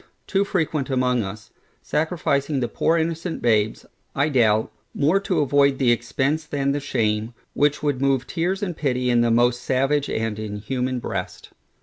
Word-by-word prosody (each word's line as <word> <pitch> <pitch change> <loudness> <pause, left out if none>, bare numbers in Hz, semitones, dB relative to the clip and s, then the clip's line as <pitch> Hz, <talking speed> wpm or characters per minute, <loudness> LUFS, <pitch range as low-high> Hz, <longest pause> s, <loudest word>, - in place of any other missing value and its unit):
too 195 0 +1
frequent 160 -7 -1
among 125 -2 +1
us, 105 +1 -7 0.3
sacrificing 150 -3 0
the 120 - 0
poor 165 +6 +1
innocent 165 +1 -2
babes, 110 -2 +1 0.3
I 145 +3 +2
doubt, 110 -6 +2 0.2
more 155 +7 +3
to 190 -5 0
avoid 140 -1 +3
the 130 -3 +3
expence 135 +6 0
than 140 -2 0
the 145 - -1
shame, 115 -4 -1 0.2
which 145 +1 +1
would 145 -3 0
move 135 -2 +2
tears 185 +4 -2
and 180 -4 -3
pity 125 -4 0
in 120 -1 +4
the 120 - +2
most 120 +1 +2
savage 135 +3 +1
and 110 -1 -2
inhuman 125 +5 -3
breast. 120 - -5
135 Hz, 160 wpm, -23 LUFS, 120-150 Hz, 0.3 s, in